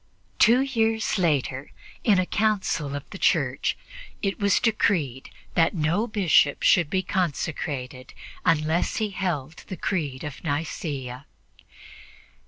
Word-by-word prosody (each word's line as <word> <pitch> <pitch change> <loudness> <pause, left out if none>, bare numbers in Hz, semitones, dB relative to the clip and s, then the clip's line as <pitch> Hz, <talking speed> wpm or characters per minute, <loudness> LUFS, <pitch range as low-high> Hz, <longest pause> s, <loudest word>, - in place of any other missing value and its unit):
Two 240 +4 +6
years 225 -6 0
later, 140 -5 0 0.3
in 210 -4 +4
a 185 - +2
council 190 -9 0
of 145 - -6
the 195 - -8
Church, 135 -7 +1 0.5
it 195 -1 -1
was 200 -1 +3
decreed 170 - 0 0.2
that 165 +2 +2
no 170 +8 +1
Bishop 185 -9 +3
should 170 -5 +4
be 190 +2 0
consecrated 145 -7 -3 0.3
unless 160 +2 +1
he 215 -2 -1
held 165 -6 -3
the 185 - -6
Creed 150 -8 -2
of 150 -2 -7
Nicea. 145 -4 -4
165 Hz, 120 wpm, -25 LUFS, 145-200 Hz, 0.5 s, Two